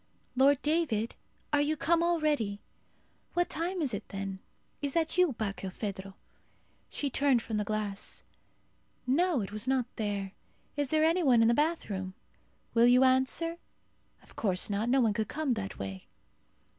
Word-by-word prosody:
Lord 270 +1 +5
David? 295 -9 +1 0.4
Are 290 - +4
you 305 +2 0
come 335 +2 +2
already? 305 -12 +1 0.8
What 350 0 +1
time 345 +2 -2
is 260 -5 -1
it 200 - -5
then? 195 -1 -5 0.4
Is 285 -2 -2
that 325 -1 0
you, 360 -5 +4
Barkilphedro?" 195 -2 -5 0.7
She 285 -2 -3
turned 270 -4 +2
from 220 - -3
the 210 - +1
glass. 205 -1 -3 0.8
"No! 305 +2 +2
it 195 - -5
was 215 +2 -4
not 260 -2 +2
there. 205 -3 -2 0.4
Is 290 -2 -1
there 310 +1 +3
any 330 +3 +3
one 250 -7 +5
in - - +5
the 235 - +5
bathroom? 215 - -1 0.6
Will 235 +1 +5
you 250 +1 +6
answer? 265 +6 +2 0.7
Of - - -19
course 190 -1 +1
not. 210 +4 0
No 265 +1 +4
one 220 -3 +3
could 220 -1 -1
come 305 +1 -1
that 200 -4 -5
way." 95 -1 -6
250 Hz, 155 wpm, -30 LUFS, 205-305 Hz, 0.8 s, you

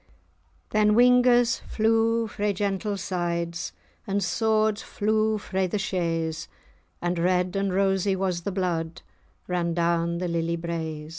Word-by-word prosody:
Then 210 0 +3
whingers 245 -1 +5
flew 225 +1 +2
frae 205 -1 -1
gentles' 200 0 -2
sides, 170 -2 -2 0.4
And 200 0 0
swords 215 +2 +1
flew 215 +1 0
frae 190 -2 -2
the 195 - -2
shea's,[#] 165 -5 -2 0.6
And 175 0 0
red 180 +1 +1
and 195 -1 0
rosy 195 0 +1
was 185 -2 -1
the 200 - -3
blood 175 -3 -2 0.4
Ran 170 -2 -1
down 170 0 +1
the 180 +1 -2
lily 170 0 -1
braes. 160 -2 -4
185 Hz, 130 wpm, -26 LUFS, 170-210 Hz, 0.6 s, whingers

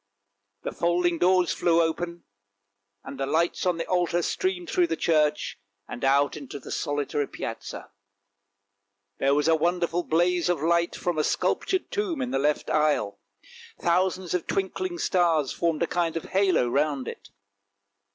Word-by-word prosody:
The - - -3
folding 175 0 +1
doors 180 -3 +3
flew 170 +1 +2
open, 170 +1 -1 0.8
and 135 - -9
the 135 - -1
lights 170 +5 +1
on 180 -2 +1
the 165 - -3
altar 175 -1 +1
streamed 370 - -1
through 355 0 +2
the 335 - -2
church, 150 -8 +1 0.3
and 120 - -7
out 140 +1 +3
into 145 -2 -7
the - - -10
solitary 145 0 -1
Piazza. - - -7 1.3
There 140 +1 +3
was 150 +1 +1
a 165 - +5
wonderful 175 +1 0
blaze 175 +1 +1
of 175 -3 +1
light 170 +2 +1
from 175 -3 -2
a - - +2
sculptured 375 - 0
tomb 395 -7 -1
in 255 -1 -2
the - - +1
left 150 +2 0
aisle; 150 -9 +1 0.6
thousands 180 +1 +1
of 180 -2 -1
twinkling 345 - -2
stars 170 - +2
formed 165 -2 0
a - - +3
kind 170 -2 -1
of 165 - -4
halo 190 -9 +2
round 140 0 0
it. - - -8
170 Hz, 155 wpm, -26 LUFS, 150-180 Hz, 1.3 s, a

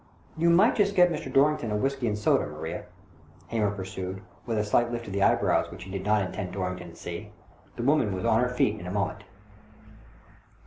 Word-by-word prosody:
" - - -31
You 170 +1 +2
might 190 +8 +5
just 200 -1 +2
get 180 -2 +6
Mr. 150 -4 -4
Dorrington 140 -3 +3
a 105 - -1
whisky 135 +2 -1
and 105 -1 0
soda, 105 - +2
Maria," 80 +2 -6 0.6
Hamer 110 -3 +1
pursued, 95 -1 -5 0.2
with 115 -2 -1
a 105 - +2
slight 120 +3 +2
lift 120 -1 -4
of 100 - -7
the 100 - -1
eyebrows - - +3
which - - -9
he 95 - -10
did 95 -1 -4
not 105 -1 +3
intend 90 0 -5
Dorrington 90 -2 -4
to 85 - -14
see. 90 +5 -7 0.5
The 120 - -4
woman 135 -5 +3
was 95 +3 -3
on 115 0 +4
her 125 - +1
feet 110 -4 +1
in 90 - -8
a - - -4
moment. 100 0 -2
105 Hz, 215 wpm, -27 LUFS, 95-125 Hz, 0.6 s, get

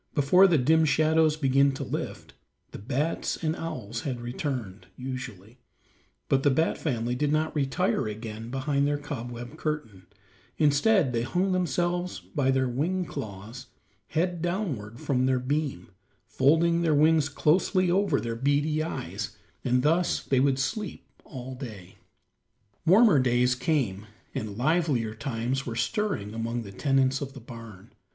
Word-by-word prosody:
Before 175 +6 +6
the 170 -4 +3
dim 160 +5 +4
shadows 155 +1 +3
began 140 -1 +3
to - - -4
lift, - - -5 0.4
the - - -8
bats 140 +9 -1
and 160 0 0
owls 120 -8 -5
had 130 -4 -3
returned, 120 -5 -4
usually, 125 -4 -7 0.7
but 135 - +2
the 145 - +4
bat 160 +5 +1
family 120 -5 -1
did 145 +3 0
not 155 +1 0
retire 135 -4 0
again 110 +1 -6
behind 140 +2 0
their 145 0 +1
cobweb 120 -1 -7
curtain; 115 - -4 0.5
instead 150 - +3
they 115 - +1
hung 180 +10 0
themselves 175 +1 0
by 140 -4 -1
their 130 -1 +2
wing 170 +9 -1
claws 110 - -7 0.4
head 175 +1 -1
downward 160 - -3
from 130 -2 +1
their 130 -1 +2
beam, 135 - -2 0.4
folding 160 +9 +3
their 160 -3 +2
wings 155 0 +4
closely 180 +5 +2
over 190 -6 +2
their 115 -1 -3
beady 145 +5 +1
eyes, 105 - -4 0.3
and 125 0 +2
thus 165 +4 +2
they 135 - +1
would 135 0 +3
sleep 200 - -3 0.2
all 130 -1 -7
day. 105 -9 -9 0.9
Warmer 195 - +6
days 125 0 +3
came, 125 - -1 0.3
and 105 -2 -4
livelier 135 -5 +1
times 125 +2 -3
were 115 - -3
stirring 200 - -1
among 115 +1 -3
the 100 - -9
tenants 135 +4 +1
of 135 -1 -5
the 135 - -9
barn. 115 -5 -11
135 Hz, 145 wpm, -27 LUFS, 120-155 Hz, 0.9 s, Before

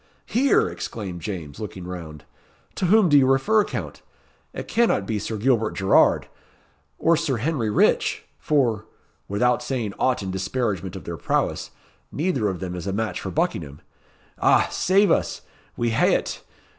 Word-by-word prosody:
"Here!" 265 +4 +3
exclaimed 95 -6 -6
James, 80 -6 -6
looking 95 -4 -7
round. 85 -4 -8 0.5
"To - - -2
whom 210 +1 +5
do 145 -3 +6
you 130 - +3
refer, 205 +12 +3
Count? - - -6 0.5
It - - -7
cannot 230 - +2
be 105 +1 -2
Sir 110 +2 -4
Gilbert 115 -1 +1
Gerrard, 95 -1 +3 0.7
or 170 +1 +3
Sir 155 -6 -1
Henry 125 -2 -1
Rich; 105 - +2
for 115 -8 +1 0.4
without 125 +5 +1
saying 120 -5 -3
aught 125 -4 +1
in 95 - -3
disparagement 95 -1 -2
of 95 - -8
their 85 -1 -6
prowess - - -1 0.4
neither 145 - 0
of 95 -3 -4
them 90 -2 -5
is 90 +1 -6
a - - 0
match 105 -2 -2
for - - -4
Buckingham! 75 -3 -2 0.6
Ah! - - +4
save 195 +2 +3
us! - - 0 0.3
We 120 -1 0
hae 115 - +3
it. - - -3
110 Hz, 155 wpm, -23 LUFS, 95-135 Hz, 0.7 s, do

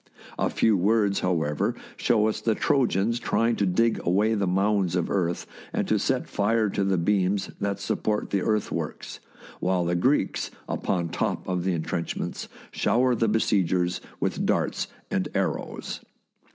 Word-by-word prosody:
A - - +2
few 110 -2 +3
words, 100 +1 +2
however, 80 -5 0 0.2
show 110 -1 +2
us 110 - -2
the 110 -2 +1
Trojans 115 -5 +1
trying 115 -1 +1
to 100 - +1
dig 115 +5 +2
away 105 +6 +2
the 100 -3 0
mounds 95 -1 +1
of 90 -2 0
earth 90 -3 0 0.3
and - - -1
to - - +2
set - - 0
fire 110 +1 +1
to 100 - 0
the 95 -1 +1
beams 95 +2 +1
that 100 0 -1
support 105 -1 -1
the 100 - +1
earthworks, 105 +1 -2 0.4
while 90 -1 +1
the 85 - 0
Greeks, 130 +12 +1 0.2
upon 85 -3 -1
top - - -2
of 90 -2 -1
the 95 - +1
intrenchments, 85 0 -3 0.2
shower 125 +1 +2
the 115 -1 +1
besiegers 90 -5 +1 0.2
with - - -1
darts - - 0 0.2
and - - 0
arrows. - - -2
100 Hz, 150 wpm, -26 LUFS, 90-110 Hz, 0.4 s, few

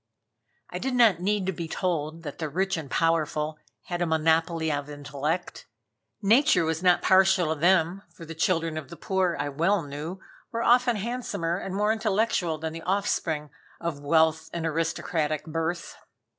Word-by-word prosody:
I - - -4
did 265 -1 -2
not 225 -8 +5
need 200 +1 0
to 190 - 0
be 170 -2 -5
told 165 -2 -2
that 145 -3 -7
the 155 -2 -2
rich 190 +5 0
and 155 -5 -6
powerful 155 -1 0 0.2
had 175 -1 -4
a 175 - +1
monopoly 160 0 +1
of 145 0 -3
intellect: 145 +3 -4 0.6
Nature 230 - +4
was 160 0 -1
not 180 -1 +4
partial 190 -3 +4
to 155 - -9
them, 180 +1 +3
for 165 0 -11
the 165 - -7
children 165 -1 0
of 145 - -11
the 170 - -10
poor, 190 -3 0
I 145 - -1
well 170 +6 +1
knew, 150 +6 -6 0.3
were 230 0 -2
often 245 0 +4
handsomer 210 -6 -2
and 190 -1 -5
more 210 +2 +2
intellectual 215 -6 0
than 160 +1 -4
the 165 - -7
offspring 165 -6 -1 0.3
of 170 -4 -3
wealth 160 +2 +2
and 170 -1 -3
aristocratic 160 -1 -1
birth. 165 +2 -3
165 Hz, 170 wpm, -26 LUFS, 155-190 Hz, 0.6 s, not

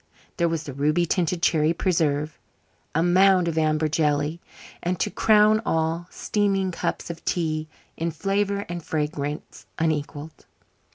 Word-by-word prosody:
There 170 -1 +2
was 165 -1 -2
the 145 - -7
ruby 150 +5 +1
tinted 175 0 0
cherry 155 0 +3
preserve, 155 -5 0 0.6
a 165 - +3
mound 185 0 +4
of 165 - -1
amber 155 0 +2
jelly, 150 +1 0 0.4
and, 175 0 -2
to - - 0
crown 215 0 +4
all, 165 0 -1
steaming 195 -3 0
cups 170 - -3
of 165 - -11
tea, 155 -3 -1 0.3
in 165 +1 -1
flavour 200 +4 -1
and 175 -1 -5
fragrance 150 -1 -4
unequalled. 155 -1 -3
165 Hz, 135 wpm, -24 LUFS, 155-180 Hz, 0.6 s, mound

